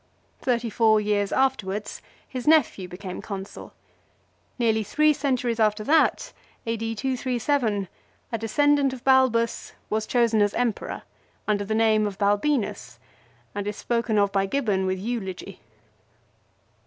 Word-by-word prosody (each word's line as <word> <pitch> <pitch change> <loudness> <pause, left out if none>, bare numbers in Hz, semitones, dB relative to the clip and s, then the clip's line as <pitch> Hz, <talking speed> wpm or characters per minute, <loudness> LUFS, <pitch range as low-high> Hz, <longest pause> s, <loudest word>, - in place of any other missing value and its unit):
Thirty 235 -3 -1
four 220 -1 +4
years 205 -1 0
afterwards 215 -7 -1 0.3
his 255 -1 -6
nephew 290 -12 +3
became 180 +1 -7
Consul. 195 -2 -8 0.9
Nearly 225 -3 +2
three 305 +9 +3
centuries 255 -5 -1
after 215 -1 +2
that, 315 +7 +2 0.3
A.D. 225 0 -2
237, 245 -3 -1 0.4
a 230 - -1
de 225 - -4
scendant 290 +2 +3
of 255 -1 -9
Balbus 255 -3 +2 0.2
was 215 0 -1
chosen 230 -3 +2
as 205 0 +1
Emperor, 240 -4 -2 0.4
under 205 -1 +1
the 220 +2 -1
name 220 -1 +3
of 195 -2 -6
Balbinus, 205 +5 0 0.6
and 205 0 -4
is 210 - -4
spoken 230 -2 -1
of 200 -1 +3
by 195 0 +1
Gibbon 205 -6 0
with 185 0 -1
eulogy. 195 -3 -5
225 Hz, 130 wpm, -25 LUFS, 205-250 Hz, 0.9 s, four